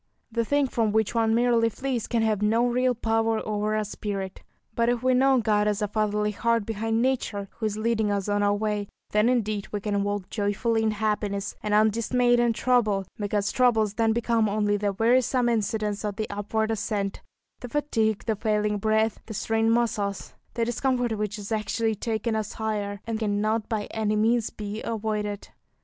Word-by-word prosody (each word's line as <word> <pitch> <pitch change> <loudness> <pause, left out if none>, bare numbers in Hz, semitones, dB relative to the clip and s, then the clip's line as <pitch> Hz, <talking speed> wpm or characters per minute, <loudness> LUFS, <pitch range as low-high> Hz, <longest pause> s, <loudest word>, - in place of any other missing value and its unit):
The 230 0 0
thing 285 +4 +2
from 225 -4 0
which 220 -1 +1
one 225 -1 +2
merely 235 -1 +3
flees 255 0 -3
can 230 -2 +1
have 215 -2 +1
no 225 +3 +3
real 250 +1 +2
power 225 -1 +1
over 210 0 0
our 215 - +1
spirit; 200 -2 -5 0.3
but 235 +1 +1
if 245 0 0
we 255 0 +3
know 265 +1 +4
God 210 -2 +2
as 210 -1 0
a 210 - 0
fatherly 210 0 0
Heart 230 0 0
behind 225 +1 -1
nature, 220 -6 -1
who 220 - -3
is 210 0 -4
leading 220 -1 +1
us 200 -1 -1
on 205 0 +1
our 205 0 +3
way, 210 -1 -1 0.2
then 210 +3 +3
indeed 215 -5 0
we 210 - -2
can 205 0 -1
walk 205 -1 -2
joyfully 220 +2 0
in 220 - +2
happiness, 210 -2 -1
and 210 -1 0
undismayed 230 +3 +3
in 240 -1 +3
trouble; 215 -5 +2
because 205 0 0
troubles 225 -5 +3
then 225 0 +2
become 230 -1 +1
only 205 0 +1
the 205 0 0
wearisome 245 +3 +2
incidents 215 -2 -1
of 205 -2 -2
the 215 0 -3
upward 220 +2 -1
ascent, 205 -2 -2 0.4
the 245 - -7
fatigue, 225 -7 0
the 220 - 0
failing 210 -1 0
breath, 220 +1 +1
the 220 - -6
strained 225 +2 +1
muscles, 220 -4 -1 0.2
the 230 -1 +1
discomfort 245 -1 0
which 210 0 -3
is 205 +1 -8
actually 220 +1 0
taking 220 +1 -2
us 215 -2 -3
higher, 205 -2 -3
and 225 -1 -3
cannot 215 +1 0
by 220 -3 -1
any 215 -1 0
means 225 +2 +2
be 210 0 -6
avoided. 210 -2 -3
220 Hz, 185 wpm, -26 LUFS, 210-230 Hz, 0.4 s, know